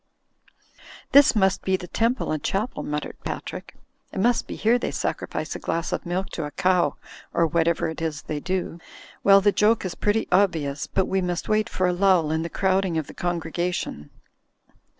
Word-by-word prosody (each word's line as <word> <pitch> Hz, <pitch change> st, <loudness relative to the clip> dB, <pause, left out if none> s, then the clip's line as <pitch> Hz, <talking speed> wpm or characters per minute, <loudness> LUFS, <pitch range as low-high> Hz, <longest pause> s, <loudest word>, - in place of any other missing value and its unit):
"This 285 Hz, -2 st, +7 dB
must 190 Hz, -3 st, +2 dB
be 190 Hz, -, +1 dB
the 180 Hz, -, -9 dB
temple 235 Hz, +6 st, 0 dB
and 155 Hz, -1 st, -2 dB
chapel," 210 Hz, -, -2 dB
muttered 150 Hz, 0 st, -4 dB
Patrick, -, -, -6 dB, 0.4 s
"it -, -, -5 dB
must 240 Hz, +4 st, +2 dB
be -, -, -5 dB
here 235 Hz, +3 st, +2 dB
they -, -, -2 dB
sacrifice -, -, -3 dB
a -, -, -5 dB
glass 165 Hz, 0 st, -2 dB
of -, -, -3 dB
milk 185 Hz, +2 st, -2 dB
to 165 Hz, -, -4 dB
a -, -, -4 dB
cow, 180 Hz, +3 st, +1 dB, 0.4 s
or 170 Hz, -, +4 dB
whatever 165 Hz, +1 st, +1 dB
it 160 Hz, 0 st, -6 dB
is 155 Hz, -2 st, -3 dB
they 150 Hz, -, -4 dB
do. 180 Hz, 0 st, -3 dB, 0.4 s
Well, 195 Hz, 0 st, +7 dB
the 205 Hz, +1 st, +4 dB
joke 210 Hz, +1 st, +2 dB
is 180 Hz, -, -3 dB
pretty 210 Hz, +2 st, 0 dB
obvious, 160 Hz, -7 st, +1 dB
but 190 Hz, -, +1 dB
we 190 Hz, 0 st, 0 dB
must 175 Hz, -1 st, -2 dB
wait 215 Hz, 0 st, +2 dB
for 185 Hz, -, 0 dB
a 180 Hz, -, +2 dB
lull 180 Hz, -4 st, +3 dB
in 160 Hz, 0 st, 0 dB
the 165 Hz, -, -4 dB
crowding 190 Hz, -2 st, +1 dB
of 160 Hz, -, -1 dB
the -, -, -11 dB
congregation." 175 Hz, -, -3 dB
180 Hz, 190 wpm, -24 LUFS, 165-195 Hz, 0.4 s, This